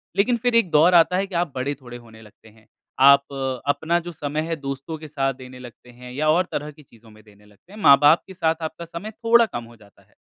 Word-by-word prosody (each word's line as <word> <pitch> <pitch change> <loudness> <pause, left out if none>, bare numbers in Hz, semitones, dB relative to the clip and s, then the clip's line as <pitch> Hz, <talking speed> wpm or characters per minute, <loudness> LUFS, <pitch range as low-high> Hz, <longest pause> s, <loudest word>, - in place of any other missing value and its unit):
लेकिन 235 +4 +2
फिर 245 -1 +1
एक 230 -6 +3
दौर 160 +4 +4
आता 175 +2 +4
है 195 +1 -1
कि 190 - -9
आप 170 -2 -1
बड़े 130 +3 -2
थोड़े 120 -1 -10
होने 115 -2 -16
लगते 110 +1 -19
हैं। 110 0 -24 0.3
आप 140 +1 +5 0.3
अपना 165 +4 0
जो 175 - -6
समय 150 -1 -4
है 165 - -2
दोस्तों 140 +2 -6
के 155 0 -11
साथ 135 -2 -2
देने 130 0 -13
लगते 125 0 -14
हैं 125 +1 -13
या 155 +4 -2
और 175 +4 +3
तरह 150 +1 -4
की 150 +1 -19
चीज़ों 115 -4 -21
में 110 0 -19
देने 105 -1 -22
लगते 105 - -24
हैं। 215 - -11
माँ-बाप 145 -1 +6
के 190 - -11
साथ 165 -3 0
आपका 160 +1 -6
समय 170 +6 -8
थोड़ा 230 +1 +3
कम 120 - -7
हो 115 0 -15
जाता 105 -2 -22
है। - - -33
145 Hz, 250 wpm, -22 LUFS, 125-170 Hz, 0.3 s, माँ-बाप